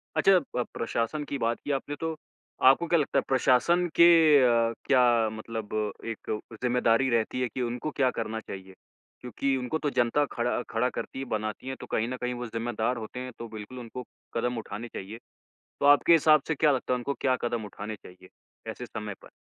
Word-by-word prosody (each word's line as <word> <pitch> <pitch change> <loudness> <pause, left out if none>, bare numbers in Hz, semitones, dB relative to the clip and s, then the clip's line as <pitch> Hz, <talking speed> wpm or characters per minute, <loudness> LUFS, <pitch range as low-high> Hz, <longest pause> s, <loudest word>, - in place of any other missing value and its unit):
अच्छा 195 -1 +5 0.2
प 125 - +1
प्रशासन 115 +6 -2
की 140 - -2
बात 115 -2 -1
की 145 - -2
आपने 140 +1 -2
तो 160 0 -2 0.5
आपको 135 +6 +5
क्या 170 0 +3
लगता 140 -1 0
है - - -3
प्रशासन 135 +7 +3
के 170 - +8 0.4
अ, 115 -2 +3
क्या 130 -2 +4 0.3
मतलब 110 0 -6 0.3
एक 115 -2 -5 0.3
ज़िम्मेदारी 125 +1 +2
रहती 115 +1 0
है 125 - +1
कि 125 +3 -5
उनको 125 +5 -3
क्या 135 -4 +2
करना 110 -1 -3
चाहिए? 95 -3 -9 0.5
क्योंकि 135 +3 -1
उनको 130 +5 -2
तो 150 - -1
जनता 125 +3 +2
खड़ा 120 0 -1
खड़ा 120 +3 +1
करती 130 - -6
है, 135 - -4
बनाती 110 +1 -4
है। 130 - -3
तो - - -10
कहीं 110 - +1
न 130 - -4
कहीं 125 0 -1
वो 125 0 -5
ज़िम्मेदार 115 +1 -2
होते 110 +2 -7
हैं, 130 0 -6
तो 115 - -6
बिल्कुल 110 +3 -8
उनको 125 +1 -7 0.3
कदम 120 +1 -1
उठाने 115 +1 -6
चाहिए। 110 -1 -8 0.6
तो - - +2
आपके 145 +3 +6
हिसाब 155 -2 +6
से 160 - +1
क्या 150 0 +3
लगता 130 -1 -1
है - - +3
उनको 140 +3 -3
क्या 130 -1 +2
कदम 120 -2 -2
उठाने 105 +1 -7
चाहिए 95 -1 -15 0.4
ऐसे - - -7
समय 105 -2 -6
पर? - - -14
125 Hz, 200 wpm, -28 LUFS, 115-135 Hz, 0.6 s, के